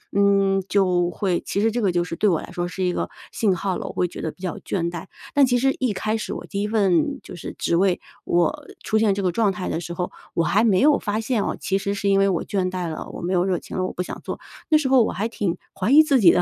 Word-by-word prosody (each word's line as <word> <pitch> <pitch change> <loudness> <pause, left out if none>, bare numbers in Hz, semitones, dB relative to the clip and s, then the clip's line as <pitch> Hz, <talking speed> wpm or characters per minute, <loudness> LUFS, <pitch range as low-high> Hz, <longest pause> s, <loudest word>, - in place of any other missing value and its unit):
嗯， 195 -1 +3
就 180 -3 +2
会 185 -4 -1
其 200 - -1
实 225 +1 +3
这 240 +1 -1
个 195 - +2
就 175 0 +1
是 165 -1 -5
对 210 - +2
我 165 -4 +1
来 - - -10
说 175 0 -2
是 185 +1 -4
一 180 -1 +1
个 - - -2 0.2
信 200 -5 +1
号 190 +1 -2
了。 - - -5
我 - - -6
会 180 - +1
觉 - - -8
得 160 - -2
比 - - -22
较 185 -2 -3
倦 170 -3 -2
怠， 170 0 -6 0.3
但 285 -1 +6
其 245 -1 +2
实 270 +2 +2
一 250 -5 +1
开 215 +3 -1
始 215 - -4
我 - - -6
第 200 0 -3
1 210 - 0
份 215 - +2
就 - - -9
是 175 - -7
职 - - 0
位， 185 +1 +2 0.3
我 175 0 +1 0.2
出 220 - +1
现 215 -2 +3
这 200 - -2
个 180 - +2
状 210 +2 +2
态 185 -1 -4
的 - - -1
时 170 0 -6
候， 180 +1 -3 0.2
我 170 - +1
还 200 +8 +3
没 200 -5 +4
有 295 0 +5
发 210 0 -2
现 225 -2 0
哦， - - -2
其 195 - 0
实 200 +1 -2
是 200 0 -1
因 195 - +4
为 195 - +4
我 180 -4 0
倦 185 -2 -1
怠 180 -2 -3
了， 155 - -6
我 - - -8
没 180 +2 -1
有 180 0 +2
热 185 -3 0
情 - - -8
了， 185 - 0
我 - - -4
不 - - -3
想 180 - -5
做。 - - -5 0.3
那 310 - +6
时 275 -4 0
候 260 -3 +6
我 - - -1
还 210 +5 -2
挺 200 -6 -2 0.2
怀 195 +6 +1
疑 300 +3 +9
自 280 -4 +3
己 180 -6 +7
的， 180 - +3
195 Hz, 320 characters per minute, -23 LUFS, 180-220 Hz, 0.3 s, 疑